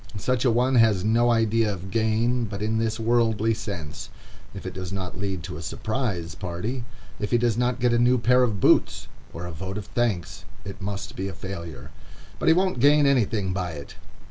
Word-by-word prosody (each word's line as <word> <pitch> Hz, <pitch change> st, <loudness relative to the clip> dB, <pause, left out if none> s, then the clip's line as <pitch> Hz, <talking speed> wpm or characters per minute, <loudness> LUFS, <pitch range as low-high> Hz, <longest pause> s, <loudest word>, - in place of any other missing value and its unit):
Such 125 Hz, +5 st, 0 dB
a -, -, +5 dB
one 125 Hz, +3 st, +2 dB
has 110 Hz, -5 st, +4 dB
no 115 Hz, +3 st, +3 dB
idea 115 Hz, -1 st, +2 dB
of 95 Hz, -1 st, -7 dB
gain 115 Hz, +3 st, +1 dB
but 100 Hz, -1 st, -5 dB
in 110 Hz, +1 st, 0 dB
this 115 Hz, 0 st, -1 dB
worldly 115 Hz, -1 st, +2 dB
sense. 85 Hz, -9 st, -6 dB, 0.4 s
If -, -, -9 dB
it -, -, -5 dB
does 95 Hz, -1 st, -6 dB
not 95 Hz, -2 st, -5 dB
lead 95 Hz, -4 st, -3 dB
to 75 Hz, -, -6 dB
a -, -, -7 dB
"surprise" 95 Hz, -, -3 dB
party, 100 Hz, +8 st, -4 dB, 0.3 s
if 105 Hz, -, -2 dB
he 120 Hz, -, +3 dB
does 120 Hz, -2 st, +1 dB
not 125 Hz, +1 st, 0 dB
get 120 Hz, -1 st, +2 dB
a 120 Hz, -, +3 dB
new 125 Hz, +1 st, +4 dB
pair 125 Hz, +2 st, +4 dB
of 110 Hz, -6 st, +1 dB
boots, -, -, +3 dB, 0.2 s
or 85 Hz, +1 st, -7 dB
a 90 Hz, -, -6 dB
vote 95 Hz, +5 st, -5 dB
of 105 Hz, -, -5 dB
thanks, 110 Hz, -8 st, -2 dB, 0.2 s
it 100 Hz, +1 st, -8 dB
must 100 Hz, 0 st, -5 dB
be 95 Hz, +1 st, -3 dB
a 95 Hz, -, -5 dB
failure. 85 Hz, -7 st, -7 dB, 0.5 s
"But -, -, -2 dB
he 160 Hz, -, +8 dB
won't 185 Hz, -5 st, +1 dB
gain 145 Hz, +3 st, +5 dB
anything 110 Hz, -8 st, +1 dB
by 90 Hz, -2 st, -3 dB
it." 70 Hz, -2 st, -9 dB
110 Hz, 205 wpm, -25 LUFS, 95-120 Hz, 0.5 s, he